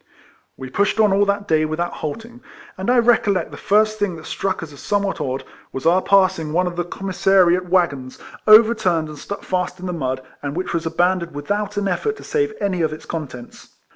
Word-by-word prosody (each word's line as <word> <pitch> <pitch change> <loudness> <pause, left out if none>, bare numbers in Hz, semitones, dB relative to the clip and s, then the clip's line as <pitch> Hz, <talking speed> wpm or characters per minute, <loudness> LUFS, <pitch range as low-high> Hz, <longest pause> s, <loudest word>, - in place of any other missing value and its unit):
We 130 -1 -8
pushed 200 +6 +1
on 210 -3 +4
all 200 +1 +3
that 200 0 -1
day 155 -1 +3
without 155 +3 -2
halt 155 +9 -5
ing; 240 +1 -15 0.3
and 190 +4 -3
I 250 - +4
recollect 225 -5 +2
the - - -8
first 215 +1 +2
thing 205 -4 0
that 160 - -11
struck 190 -2 -2
us 155 -3 -9
as 140 - -13
somewhat 200 -4 -1
odd, 135 -2 -3 0.3
was 135 - -6
our 175 +3 +4
passing 185 -6 +2
one 180 +2 +2
of 180 -1 -3
the 175 - -1
commissariat 185 -1 +2
waggons, 145 -8 0 0.3
overturned 215 -7 +5
and 150 -1 -9
stuck 200 - -7
fast 180 -1 -2
in 185 - -7
the 180 - -3
mud, 130 -5 -3 0.2
and 145 0 -4
which 185 +2 -3
was 165 -1 -1
abandoned 170 0 0
without 205 +8 -3
an 205 -1 0
effort 430 - -1
to - - -11
save 435 -1 0
any 190 -3 -1
of 160 -2 +1
its 155 - -8
contents. 135 -7 -8
180 Hz, 210 wpm, -20 LUFS, 160-205 Hz, 0.3 s, overturned